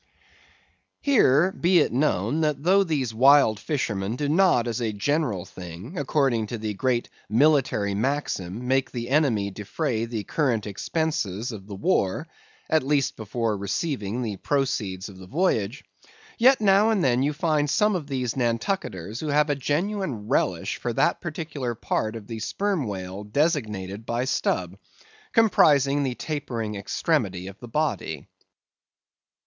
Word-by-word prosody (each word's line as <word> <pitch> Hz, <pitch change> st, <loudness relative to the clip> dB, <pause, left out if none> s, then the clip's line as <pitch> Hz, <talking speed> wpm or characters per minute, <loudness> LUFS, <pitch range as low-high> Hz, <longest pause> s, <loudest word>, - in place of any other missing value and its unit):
Here 185 Hz, -, +4 dB
be 180 Hz, 0 st, +2 dB
it -, -, +3 dB
known, 130 Hz, -, +1 dB
that 150 Hz, -2 st, 0 dB
though 195 Hz, +3 st, +5 dB
these 140 Hz, -10 st, -1 dB
wild 130 Hz, -2 st, +5 dB
fishermen 110 Hz, -8 st, -2 dB
do 145 Hz, +3 st, -2 dB
not, 155 Hz, -6 st, +3 dB
as 120 Hz, +1 st, -2 dB
a 115 Hz, -2 st, 0 dB
general 105 Hz, -, -1 dB
thing, 90 Hz, +3 st, -9 dB
and 180 Hz, -, -6 dB
according 135 Hz, -6 st, +1 dB
to 120 Hz, -, -4 dB
the 110 Hz, -1 st, -3 dB
great 120 Hz, +3 st, 0 dB, 0.2 s
military 120 Hz, -5 st, +3 dB
maxim, 115 Hz, -3 st, -2 dB
make 135 Hz, +1 st, +2 dB
the 120 Hz, -1 st, -5 dB
enemy 125 Hz, -9 st, +2 dB
defray 110 Hz, -, -2 dB
the 115 Hz, -3 st, -4 dB
current 120 Hz, -, 0 dB
expenses 115 Hz, -, -2 dB
of 100 Hz, -3 st, -9 dB
the 100 Hz, -, -7 dB
war 100 Hz, -, 0 dB, 0.4 s
(at 160 Hz, 0 st, +3 dB
least 140 Hz, 0 st, +1 dB
before 110 Hz, 0 st, -2 dB
realizing 110 Hz, -, -2 dB
the 105 Hz, -4 st, -3 dB
proceeds 105 Hz, -8 st, -1 dB
of 95 Hz, -3 st, -12 dB
the 95 Hz, -, -11 dB
voyage), 135 Hz, -, 0 dB, 0.6 s
yet 260 Hz, +3 st, +6 dB
now 205 Hz, +1 st, +4 dB
and 210 Hz, -5 st, +2 dB
then 125 Hz, -1 st, +3 dB
you 145 Hz, +2 st, +2 dB
find 150 Hz, -1 st, 0 dB
some 210 Hz, +6 st, +3 dB
of 160 Hz, -6 st, -4 dB
these 130 Hz, -4 st, -2 dB
Nantucketers 115 Hz, -, -2 dB
who 155 Hz, -, -4 dB
have 150 Hz, +1 st, +2 dB
a -, -, +1 dB
genuine 145 Hz, -, -2 dB
relish -, -, 0 dB
for -, -, -3 dB
that -, -, +1 dB
particular 145 Hz, -6 st, -4 dB
part 110 Hz, 0 st, -2 dB
of 110 Hz, -2 st, -8 dB
the 115 Hz, +1 st, -6 dB
Sperm 190 Hz, -, -1 dB
Whale 95 Hz, 0 st, -5 dB
designated 105 Hz, -, -1 dB
by 120 Hz, +2 st, -1 dB
Stubb; 130 Hz, -, -1 dB, 0.5 s
comprising 145 Hz, -, +4 dB
the 130 Hz, -3 st, -1 dB
tapering 120 Hz, -9 st, -4 dB
extremity 100 Hz, -, -1 dB
of 95 Hz, +2 st, -9 dB
the 120 Hz, -, -9 dB
body. 115 Hz, -, -2 dB
125 Hz, 150 wpm, -25 LUFS, 105-150 Hz, 0.6 s, yet